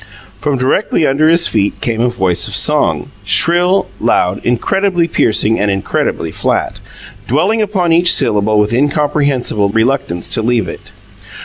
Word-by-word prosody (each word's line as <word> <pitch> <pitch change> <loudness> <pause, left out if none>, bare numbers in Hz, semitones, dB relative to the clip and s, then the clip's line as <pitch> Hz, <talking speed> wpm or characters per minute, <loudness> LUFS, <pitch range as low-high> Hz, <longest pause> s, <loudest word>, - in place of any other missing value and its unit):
From 145 +2 -1
directly 135 +6 0
under 150 +3 +2
his 170 +1 +5
feet 100 -2 -1
came 115 -1 -2
a 125 - +1
voice 90 -6 0
of - - -4
song, - - +1
shrill, 175 +3 +2
loud, 90 +2 0
incredibly 175 - 0
piercing 110 -7 +1
and 105 - 0
incredibly 95 -4 -2
flat, - - -2 0.5
dwelling 185 - +1
upon 190 -5 0
each 170 +1 +4
syllable 105 +1 +1
with 105 +2 +1
incomprehensible 140 -5 0
reluctance 110 -5 -1
to - - 0
leave 120 0 0
it. - - -10
130 Hz, 140 wpm, -13 LUFS, 105-170 Hz, 0.5 s, his